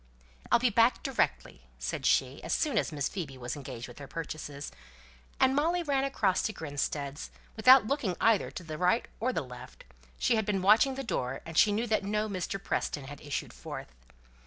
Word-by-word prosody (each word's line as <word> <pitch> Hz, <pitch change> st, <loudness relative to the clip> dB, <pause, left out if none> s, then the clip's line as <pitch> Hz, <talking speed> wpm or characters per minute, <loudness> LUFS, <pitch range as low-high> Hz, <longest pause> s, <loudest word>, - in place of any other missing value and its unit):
"I'll -, -, +7 dB
be 240 Hz, 0 st, +2 dB
back 230 Hz, +3 st, +3 dB
directly," 270 Hz, -, -1 dB, 0.2 s
said -, -, -2 dB
she, -, -, +2 dB
as -, -, -2 dB
soon 300 Hz, -3 st, +2 dB
as -, -, -2 dB
Miss 145 Hz, -3 st, -1 dB
Phoebe 155 Hz, -9 st, -5 dB
was 120 Hz, -1 st, -4 dB
engaged 130 Hz, -4 st, -7 dB
with 120 Hz, -, -12 dB
her 140 Hz, -, -8 dB
purchases; 150 Hz, -3 st, -6 dB, 0.7 s
and 265 Hz, 0 st, +4 dB
Molly 340 Hz, +5 st, +1 dB
ran 275 Hz, -3 st, +1 dB
across 210 Hz, -9 st, +1 dB
to 220 Hz, -, -2 dB
Grinstead's, 145 Hz, -2 st, -3 dB, 0.3 s
without 255 Hz, +2 st, +7 dB
looking 230 Hz, -8 st, -1 dB
either 225 Hz, -3 st, +3 dB
to 180 Hz, -, -8 dB
the 155 Hz, -2 st, -6 dB
right 180 Hz, +6 st, +2 dB
or 255 Hz, +3 st, +1 dB
the 165 Hz, -, -2 dB
left; 125 Hz, 0 st, -11 dB, 0.3 s
she 230 Hz, -, +2 dB
had 220 Hz, -, 0 dB
been 195 Hz, -3 st, 0 dB
watching 220 Hz, +7 st, +5 dB
the 270 Hz, -, -4 dB
door, 135 Hz, -, -2 dB
and 165 Hz, -, -8 dB
she 205 Hz, -, +6 dB
knew 220 Hz, +3 st, 0 dB
that 215 Hz, -2 st, +1 dB
no 210 Hz, +2 st, 0 dB
Mr. 195 Hz, -1 st, -3 dB
Preston 145 Hz, -6 st, -2 dB
had 140 Hz, +1 st, -9 dB
issued 145 Hz, -1 st, -4 dB
forth. 65 Hz, 0 st, -8 dB
190 Hz, 195 wpm, -30 LUFS, 145-235 Hz, 0.7 s, I'll